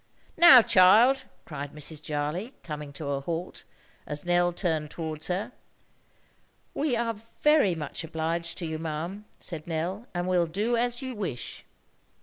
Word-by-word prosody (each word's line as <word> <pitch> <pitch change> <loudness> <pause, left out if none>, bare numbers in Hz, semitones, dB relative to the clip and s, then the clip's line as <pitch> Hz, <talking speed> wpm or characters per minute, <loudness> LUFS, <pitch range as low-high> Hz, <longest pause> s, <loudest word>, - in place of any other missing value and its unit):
"Now, 300 -8 +9
child?" 225 +10 +6 0.2
cried 145 -2 -6
Mrs. 150 +1 -4
Jarley, 155 - -3
coming 150 -2 -6
to 150 - -7
a 140 -1 -1
halt, 170 +4 -5 0.4
as 150 +1 -4
Nell 175 0 +3
turned 160 -4 -1
towards 155 -2 -5
her. 185 +3 -2 1.2
"We 285 -4 0
are 230 0 0 0.3
very 300 - +5
much 155 +2 -5
obliged 165 +1 -3
to 175 - -4
you, 160 -1 -4
ma'am," 165 +6 -5
said 165 -3 -7
Nell, 175 +8 -3
"and 175 +1 -1
will 180 -2 +2
do 210 +8 0
as 240 +2 0
you 260 -1 -4
wish." 180 - -5
175 Hz, 145 wpm, -27 LUFS, 155-210 Hz, 1.2 s, Now